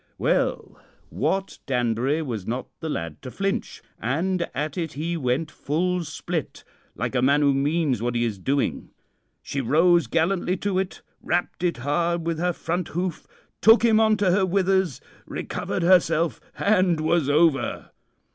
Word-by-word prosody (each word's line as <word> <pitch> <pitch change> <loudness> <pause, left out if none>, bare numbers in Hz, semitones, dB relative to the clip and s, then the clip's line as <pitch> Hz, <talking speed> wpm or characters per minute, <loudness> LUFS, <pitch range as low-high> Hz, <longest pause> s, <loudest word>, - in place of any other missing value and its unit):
"Well, - - -1 0.3
Wat 195 0 -1
Danbury 125 +4 0
was 115 -9 -5
not 125 +2 -3
the 160 - -4
lad 85 - -4
to - - -7
flinch, 195 +8 -3 0.2
and 170 - -1
at 150 +1 -3
it 165 -4 -3
he 165 +4 -3
went 150 +2 -1
full 180 +4 -1
split, 160 +1 -5 0.3
like - - -3
a 125 - +1
man 140 +3 +4
who 140 -1 +4
means 140 -3 +1
what 120 0 -1
he 120 - +1
is 105 -4 -3
doing. 135 +7 -1 0.5
She 140 - -3
rose 170 +7 +3
gallantly 180 +2 +1
to 195 0 -1
it, 190 -1 -4 0.2
rapped 175 0 -2
it 175 -1 +1
hard 170 +6 0
with 165 -1 -1
her 180 +1 +1
front 175 +1 -3
hoof, 175 0 -4 0.4
shook 225 +2 +7
him 220 -2 +5
on 220 -1 +4
to 200 -3 +2
her 190 +2 +3
withers, 190 - +1 0.3
recovered - - -3
herself, 170 -2 +3 0.2
and 185 -5 +2
was 155 -2 +1
over. 145 -4 +2
165 Hz, 155 wpm, -24 LUFS, 140-180 Hz, 0.5 s, shook